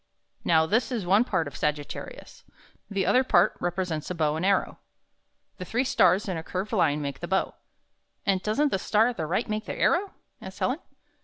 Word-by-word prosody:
Now, 160 Hz, -1 st, +4 dB
this 225 Hz, +10 st, +1 dB
is 225 Hz, -7 st, -2 dB
one 200 Hz, +6 st, +4 dB
part 185 Hz, -, -1 dB
of 145 Hz, -, -9 dB
Sag 150 Hz, 0 st, 0 dB
it 145 Hz, -, -10 dB
ta -, -, -5 dB
ri -, -, -9 dB
us. -, -, -16 dB, 0.5 s
The 200 Hz, -2 st, -1 dB
other 255 Hz, -, +4 dB
part 185 Hz, -9 st, +3 dB
represents 175 Hz, -3 st, -2 dB
a 180 Hz, -, -3 dB
bow 155 Hz, -2 st, +1 dB
and 160 Hz, -, -3 dB
arrow. 195 Hz, 0 st, +1 dB, 0.8 s
The -, -, -6 dB
three 240 Hz, +7 st, 0 dB
stars 210 Hz, -5 st, +3 dB
in 185 Hz, -3 st, -2 dB
a 160 Hz, -, -5 dB
curved 190 Hz, +4 st, -4 dB
Hne 165 Hz, -9 st, +2 dB
make 140 Hz, -2 st, -4 dB
the 175 Hz, -, -5 dB
bow." 190 Hz, +1 st, 0 dB, 0.7 s
''And 195 Hz, -2 st, +2 dB
doesn't 275 Hz, +9 st, +1 dB
the 195 Hz, -, 0 dB
star 220 Hz, +5 st, +3 dB
at 245 Hz, -, -6 dB
the 160 Hz, -3 st, -2 dB
right 190 Hz, +9 st, -1 dB
make 215 Hz, 0 st, -3 dB
the -, -, -4 dB
arrow?" 385 Hz, +3 st, +2 dB, 0.3 s
asked 190 Hz, 0 st, -9 dB
Helen. 260 Hz, +5 st, 0 dB
190 Hz, 220 wpm, -26 LUFS, 165-220 Hz, 0.8 s, Now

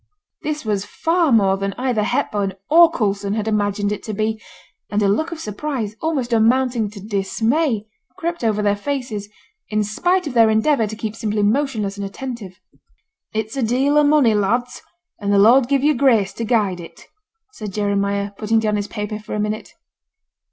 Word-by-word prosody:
This 300 Hz, -3 st, -3 dB
was 205 Hz, -2 st, 0 dB
far 325 Hz, -, 0 dB
more 195 Hz, -4 st, +4 dB
than 195 Hz, 0 st, -2 dB
either 250 Hz, -4 st, 0 dB
Hepburn 210 Hz, -4 st, -1 dB, 0.2 s
or 335 Hz, +1 st, +8 dB
Coulson 200 Hz, -7 st, -1 dB
had 215 Hz, -1 st, -2 dB
imagined 205 Hz, -1 st, 0 dB
it 210 Hz, -, -3 dB
to 215 Hz, -, -4 dB
be; 220 Hz, +1 st, -1 dB, 0.5 s
and 205 Hz, -, 0 dB
a -, -, +3 dB
look 315 Hz, +13 st, 0 dB
of 335 Hz, -, -6 dB
surprise, 220 Hz, -2 st, -4 dB
almost 275 Hz, -7 st, -1 dB
amounting 235 Hz, 0 st, +2 dB
to 205 Hz, 0 st, -11 dB
dismay, 220 Hz, -, 0 dB, 0.3 s
crept 340 Hz, -5 st, -3 dB
over 210 Hz, -2 st, +1 dB
their 205 Hz, 0 st, +2 dB
faces, 220 Hz, -4 st, -4 dB, 0.4 s
in 215 Hz, 0 st, +1 dB
spite 355 Hz, -, 0 dB
of 290 Hz, -, -4 dB
their 230 Hz, -2 st, +5 dB
endeavour 220 Hz, +2 st, +2 dB
to 220 Hz, -, -6 dB
keep 220 Hz, 0 st, -5 dB
simply 210 Hz, -2 st, -1 dB
motionless 215 Hz, -3 st, 0 dB
and 200 Hz, -, -4 dB
attentive. 220 Hz, -4 st, -7 dB, 0.8 s
'It's 220 Hz, +2 st, -2 dB
a 270 Hz, -, -1 dB
deal 260 Hz, +5 st, +2 dB
of 295 Hz, -1 st, +5 dB
money, 290 Hz, -7 st, +4 dB
lads, 235 Hz, +5 st, 0 dB, 0.4 s
and 200 Hz, -1 st, -1 dB
the 200 Hz, -, +4 dB
Lord 240 Hz, +5 st, +6 dB
give 275 Hz, -1 st, +2 dB
you 300 Hz, +1 st, +4 dB
grace 230 Hz, -9 st, +3 dB
to 230 Hz, -, -4 dB
guide 210 Hz, -6 st, +1 dB
it,' 165 Hz, -1 st, -12 dB, 0.5 s
said 215 Hz, -, -7 dB
Jeremiah, 200 Hz, 0 st, -1 dB
putting 225 Hz, +1 st, +1 dB
down 215 Hz, -1 st, +1 dB
his 205 Hz, 0 st, -3 dB
paper 210 Hz, -1 st, -5 dB
for 210 Hz, -, -6 dB
a -, -, -2 dB
minute. 210 Hz, +1 st, -3 dB
220 Hz, 180 wpm, -20 LUFS, 205-260 Hz, 0.8 s, or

